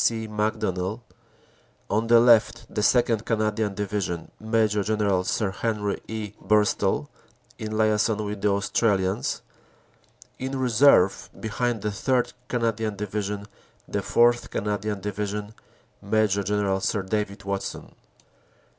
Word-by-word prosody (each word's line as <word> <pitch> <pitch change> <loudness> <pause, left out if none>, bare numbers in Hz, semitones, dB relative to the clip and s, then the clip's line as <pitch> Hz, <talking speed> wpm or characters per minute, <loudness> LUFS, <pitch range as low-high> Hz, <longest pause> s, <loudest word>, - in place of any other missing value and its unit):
C. 110 -1 +1
Macdonell; 105 -2 -1 0.9
on 110 +2 0
the 115 0 +7
left, 115 -2 +4
the - - 0
2nd. 115 -1 +3
Canadian 110 -2 0
Division, 100 -4 -3
Major 110 -2 +1
General 100 -3 +1
Sir 100 +1 0
Henry 105 -1 -2
E. 110 -2 -5
Burstall, 105 -7 +2 0.5
in 110 0 -4
liason 110 0 +2
with 105 -1 -5
the - - +2
Australians; 100 - 0 1.0
in 130 +1 -3
reserve, 125 -5 +4
behind 115 0 -2
the 105 - 0
3rd. 125 +4 0
Canadian 115 -3 -1
Division, 100 0 -3 0.4
the - - -2
4th. 120 0 +3
Canadian 105 0 -2
Division, 105 +1 -4 0.5
Major 100 -1 +1
General 100 -1 0
Sir 100 0 0
David 100 +1 -3
Watson. 100 0 -4
105 Hz, 115 wpm, -25 LUFS, 100-110 Hz, 1.0 s, the